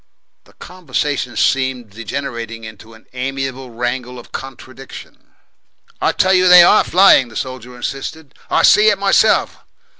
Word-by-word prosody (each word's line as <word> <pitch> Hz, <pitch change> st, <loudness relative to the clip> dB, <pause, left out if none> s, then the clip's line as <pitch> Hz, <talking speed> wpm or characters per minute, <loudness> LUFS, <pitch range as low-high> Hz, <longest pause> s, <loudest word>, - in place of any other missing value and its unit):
The -, -, -23 dB
conversation 145 Hz, -7 st, -5 dB
seemed 130 Hz, -4 st, -1 dB
degenerating 115 Hz, 0 st, -7 dB
into 110 Hz, +1 st, -13 dB
an 110 Hz, -, -20 dB
amiable 135 Hz, 0 st, -5 dB
wrangle 125 Hz, +1 st, -5 dB
of 120 Hz, -, -14 dB
contradiction. 135 Hz, 0 st, -12 dB, 0.7 s
"I -, -, +1 dB
tell 190 Hz, 0 st, +1 dB
you 185 Hz, 0 st, +3 dB
they 180 Hz, -1 st, +8 dB
ARE 195 Hz, -, +4 dB
flying," 180 Hz, -8 st, +4 dB
the 115 Hz, -, -16 dB
soldier 130 Hz, 0 st, -7 dB
insisted. 135 Hz, +3 st, -7 dB, 0.2 s
"I -, -, +1 dB
see 215 Hz, +1 st, +5 dB
it 205 Hz, -, +1 dB
myself." 200 Hz, +2 st, +1 dB
130 Hz, 140 wpm, -16 LUFS, 120-160 Hz, 0.7 s, they